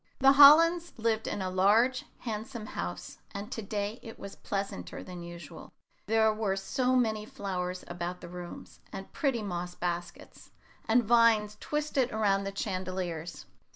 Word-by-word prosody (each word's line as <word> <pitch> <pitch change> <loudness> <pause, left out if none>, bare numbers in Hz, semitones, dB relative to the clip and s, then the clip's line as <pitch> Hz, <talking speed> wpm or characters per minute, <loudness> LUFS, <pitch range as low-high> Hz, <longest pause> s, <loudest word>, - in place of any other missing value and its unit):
The 270 +1 +6
Hollands 330 +5 +7
lived 225 -1 0
in 195 - -2
a 185 - -2
large, 220 +7 +3 0.2
handsome 225 0 -5
house, 90 - -6 0.2
and 200 +1 -6
to 225 - -4
day 205 +2 -3
it 225 - -10
was 200 0 -8
pleasanter 195 - -5
than 180 -1 -8
usual, 170 -2 -10 0.3
there 220 0 +3
were 215 -3 -1
so 250 +7 0
many 220 -4 +1
flowers 185 -3 -4
about 175 +1 -5
the - - -9
rooms, 175 0 -9
and 195 - -8
pretty 270 -8 0
moss 180 -2 -4
baskets, 175 0 -5 0.4
and 235 +2 +4
vines 225 -2 +4
twisted 295 -4 -1
around 200 -2 +1
the 195 0 -5
chandeliers. 185 -4 -4
205 Hz, 150 wpm, -30 LUFS, 180-230 Hz, 0.4 s, Hollands